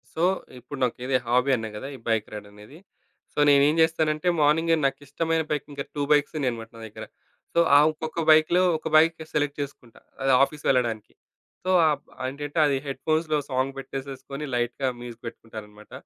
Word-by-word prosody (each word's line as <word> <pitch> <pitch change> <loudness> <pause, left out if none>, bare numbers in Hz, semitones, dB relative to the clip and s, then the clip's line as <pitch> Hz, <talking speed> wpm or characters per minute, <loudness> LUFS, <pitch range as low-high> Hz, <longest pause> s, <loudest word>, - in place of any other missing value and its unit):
So, 165 - -1 0.4
ఇప్పుడు 145 +2 -9
నాకిదీ 125 +2 0
hobby 125 +3 +2
అన్నా 110 -2 -4
కదా! 135 - -6
ఈ - - -10
బైక్ 110 -2 0
రైడ్ 105 -1 -7
అనేది. 105 +8 -14 0.6
సో, - - -4
నేనేం 145 +2 +5
జేస్తానంటే 160 0 +1
మార్నింగే 160 +3 +3
నాకిష్టమైన 145 +4 -1
బైక్ 150 -2 -2
ఇంకా 140 0 -4
2 145 - -2
బైక్స్ 145 +2 +3
ఉన్నాయనమాట 115 -5 -3
నా - - -11
దగ్గర. 110 +1 -9 0.5
సో, 170 - +2 0.2
ఆ - - +8
ఒక్కొక్క 155 +1 -6
బైకులో 155 +3 +5 0.2
ఒక 160 - -7
బైక్ 165 +1 +5
సెలెక్ట్ 145 -1 -1
చేసుకుంటా, 130 -4 -9 0.2
అది 135 0 +2
ఆఫీస్‌ 150 +1 -3
వెళ్లడానికి. 120 -5 0 0.5
సో, 185 - -3 0.2
ఆ - - +4 0.3
బండెంటంటే 145 +4 -4
అది 140 - +1
హెడ్‌ఫోన్స్‌లో 155 +2 0
సాంగ్ 130 +1 -1
పెట్టేసేసుకొని 135 +1 -7
లైట్‌గా 120 +2 -1
మ్యూజిక్ 120 -1 -10
పెట్టుకుంటాననమాట. 105 -2 -10
140 Hz, 160 wpm, -25 LUFS, 120-155 Hz, 0.6 s, ఆ